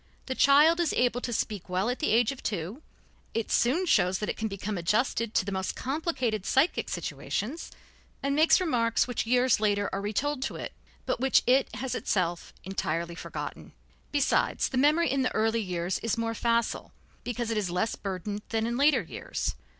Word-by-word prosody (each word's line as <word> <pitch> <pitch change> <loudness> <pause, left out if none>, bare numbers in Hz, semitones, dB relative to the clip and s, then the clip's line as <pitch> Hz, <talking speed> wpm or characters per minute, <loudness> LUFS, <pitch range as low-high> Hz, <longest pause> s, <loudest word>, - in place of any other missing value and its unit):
The 260 - -2
child 295 +6 +5
is 340 -4 +1
able 245 0 +1
to 245 - -3
speak 210 -5 -3
well 185 +3 0
at 250 +1 -1
the 310 - 0
age 230 +2 +3
of 270 - -9
two, 200 - -4 0.5
it 225 -1 -2
soon 295 +10 +2
shows 185 - +3
that 210 - -3
it - - -1
can 220 - -2
become 200 +1 -4
adjusted 215 +5 0
to - - +2
the 200 - -3
most 190 -1 -2
complicated 260 - -2
psychic 270 - +1
situations, 265 +11 -4 0.5
and 280 0 +1
makes 315 +5 +5
remarks 240 -12 +1
which 245 -2 -2
years 250 0 +3
later 205 -1 +1
are 195 - -2
retold 260 +8 -1
to - - -3
it, - - -6 0.3
but - - -1
which 265 0 +3
it 260 +2 +3
has 255 +3 -3
itself 175 -4 -1
entirely 170 -3 -2
forgotten. 170 - -7 0.4
Besides, 285 -2 +1
the 260 - -3
memory 300 +2 +3
in 275 0 +1
the 255 - -1
early 225 +1 +2
years 180 -2 -2
is 230 -1 -1
more 230 0 -1
facile, 235 +1 -1 0.3
because 240 -1 -3
it 225 - 0
is 200 -4 -1
less 180 +6 0
burdened 200 +1 -4
than 225 0 0
in 235 +1 -1
later 290 +3 +4
years. - - -4
230 Hz, 190 wpm, -28 LUFS, 200-265 Hz, 0.5 s, child